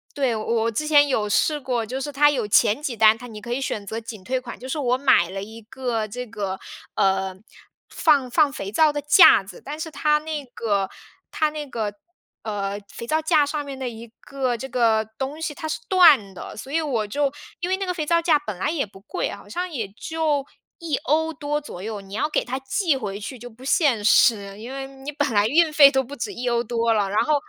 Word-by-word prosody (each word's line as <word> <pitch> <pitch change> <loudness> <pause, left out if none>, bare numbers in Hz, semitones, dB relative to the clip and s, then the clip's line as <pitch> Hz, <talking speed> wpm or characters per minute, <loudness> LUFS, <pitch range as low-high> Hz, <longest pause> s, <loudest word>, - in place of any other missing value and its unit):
对， 265 -5 +1
我 215 - -3 0.2
我 230 - 0
之 300 +8 -2
前 290 -1 +6
有 220 -6 0
试 300 +8 +2
过， 245 -4 -2
就 255 +5 -4
是 290 +2 -4
它 290 +1 +4
有 245 -7 -2
前 210 +4 +3
几 260 -6 -3
单， 220 0 +6
它 245 +2 -10
你 215 -3 -9
可 235 +3 -5
以 270 - -2
选 210 -6 -3
择 220 +3 -4
仅 220 -4 -9
退 260 +5 -1
款。 245 -1 -8
就 255 - -8
是 280 +4 -3
我 250 -2 +1
买 260 -10 +4
了 195 +1 -5
一 225 +2 -10
个 235 -1 -3
这 250 +4 -6
个， 205 -4 -4 0.4
呃， 190 -1 +1 0.5
放 290 -5 +3
放 300 0 +4
肥 200 -8 -6
皂 310 +7 +4
的 290 - -3
架 295 - +7
子， 195 - -12
但 295 +2 -6
是 320 0 -5
它 300 0 +2
那 305 -1 -5
个 205 -6 -1 0.4
它 310 -1 +1
那 300 -1 -6
个， 220 -5 -3 0.5
呃， 205 -2 -3
肥 235 - -8
皂 310 +6 0
架 310 -2 +3
上 290 0 -3
面 275 -1 -7
的 260 -2 -3
一 230 0 -10
个 260 -3 -2
这 265 +4 -7
个 225 -3 +2
东 280 +4 -4
西 320 - -2
它 315 +1 -6
是 310 - -3
断 300 - +6
的， - - -9
所 265 +5 -9
以 325 - +2
我 250 -8 -1
就， 280 +5 0 0.3
因 345 +1 -3
为 375 - +2
那 390 0 -3
个 360 - -1
肥 320 -4 -3
皂 335 +2 +2
架 325 -3 +3
本 215 -10 -6
来 195 - -1
也 305 -5 -1
不 195 -1 -16
贵， 360 - -3
好 - - -12
像 360 +1 -3
也 235 - -4
就 310 -4 -1 0.3
€1 320 0 0
多 295 0 -2
左 290 -11 -9
右， 215 -1 -4
你 195 0 -13
要 220 +9 0
给 - - 0
它 255 +2 -3
寄 280 +4 0
回 205 -5 -5
去 250 +5 -7
就 245 +1 -9
不 245 +3 -15
现 270 -7 +2
实， 205 -4 +4
因 235 +4 -8
为 270 0 -5
你 270 +2 -8
本 290 0 0
来 205 0 +3
运 320 +5 +3
费 290 -3 +9
都 265 -1 +1
不 275 +3 -9
止 230 -5 -4
€1 240 +1 -1
多 230 0 +1
了， 205 -3 +1
然 205 +2 +2
后 305 - +2
260 Hz, 250 characters per minute, -23 LUFS, 220-295 Hz, 0.5 s, 费